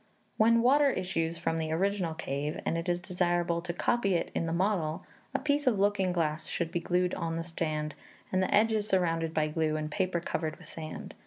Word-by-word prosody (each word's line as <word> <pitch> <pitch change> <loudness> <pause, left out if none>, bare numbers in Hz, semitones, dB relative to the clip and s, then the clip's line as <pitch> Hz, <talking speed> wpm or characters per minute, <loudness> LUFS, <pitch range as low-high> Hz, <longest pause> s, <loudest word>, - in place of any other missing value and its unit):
When 230 +1 +5
water 280 +3 +5
issues 170 -6 -1
from 165 -1 -1
the 160 -1 -2
original 180 -1 0
cave, 145 -1 -3
and - - 0
it 165 +2 -2
is 175 0 0
desirable 175 -2 0
to 175 0 -3
copy 195 +2 +1
it 170 - -1
in 165 - -1
the - - -1
model, 170 -3 0 0.3
a - - +5
piece 290 0 0
of 235 -5 +4
looking 195 -2 +2
glass 160 -3 -1
should 170 -2 -2
be 175 - 0
glued 180 +1 +1
on 165 -1 -2
the 165 - -2
stand, 155 -3 -2 0.4
and 185 - +2
the 185 - 0
edges 215 0 +3
surrounded 165 -4 +1
by 155 -1 +1
glue, 155 0 0
and 155 0 -3
paper 185 -1 0
covered 160 -2 -2
with - - -14
sand. 155 -1 -7
175 Hz, 210 wpm, -30 LUFS, 165-195 Hz, 0.4 s, When